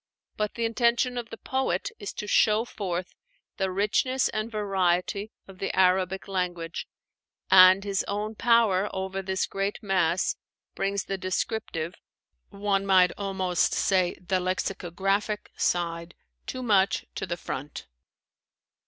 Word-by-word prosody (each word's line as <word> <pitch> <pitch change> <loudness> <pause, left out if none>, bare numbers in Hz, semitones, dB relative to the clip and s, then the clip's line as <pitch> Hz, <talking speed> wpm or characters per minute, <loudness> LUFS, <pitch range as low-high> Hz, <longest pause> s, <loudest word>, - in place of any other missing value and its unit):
But 210 -1 -2
the 235 - -1
intention 235 +2 +2
of 240 -2 -4
the 225 - -8
poet 260 -10 -1
is 205 - -5
to - - -5
show 215 +2 +3
forth 185 -6 -4 0.4
the 190 -1 0
richness 210 +7 +1
and 215 +2 -3
variety 195 0 0 0.2
of 190 -1 -13
the 195 - -2
Arabic 185 0 +2
language; 175 -3 -3 0.6
and 185 +1 +8
his 200 -1 -1
own 210 +2 -2
power 220 -4 +3
over 190 0 -3
this 190 0 -1
great 195 +1 -2
mass 185 -3 +1 0.4
brings 195 0 -1
the 195 -1 -4
descriptive 185 -3 -2 0.6
one 200 -1 0
might 185 -2 +5
almost 190 -3 0
say 185 -3 +2
the 185 +1 0
lexicographic 195 +3 -1
side 170 -1 -1 0.3
too 255 0 -4
much 200 -4 +2
to - - -4
the 170 - -3
front. 145 -3 -6
195 Hz, 130 wpm, -27 LUFS, 185-210 Hz, 0.6 s, and